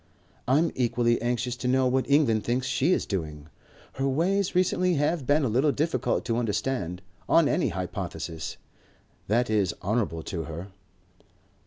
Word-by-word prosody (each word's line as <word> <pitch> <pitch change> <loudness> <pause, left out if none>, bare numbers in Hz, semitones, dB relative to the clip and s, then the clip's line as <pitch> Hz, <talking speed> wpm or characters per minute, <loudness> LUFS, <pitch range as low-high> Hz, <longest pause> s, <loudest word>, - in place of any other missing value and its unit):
"I'm 150 +7 +3
equally 120 -1 +1
anxious 120 +1 -1
to 125 - -3
know 130 +1 +3
what 130 +1 +1
England 130 -7 +3
thinks 125 +4 -1
she 135 +5 +1
is - - +1
doing. 75 -5 -5 0.4
Her 135 +1 -1
ways 180 +8 +1
recently 180 0 +2
have 145 -1 0
been 145 +1 +3
a - - +2
little 130 +7 +2
difficult 140 -4 -1
to 115 -2 0
understand. 105 -5 -2 0.3
On 165 -3 +5
any 180 - +1
hypothesis 85 -3 -5 0.7
that 120 +4 +2
is 105 -5 +1
honourable 100 -6 -1
to 85 -5 -4
her." 85 +4 -7
120 Hz, 150 wpm, -27 LUFS, 100-140 Hz, 0.7 s, On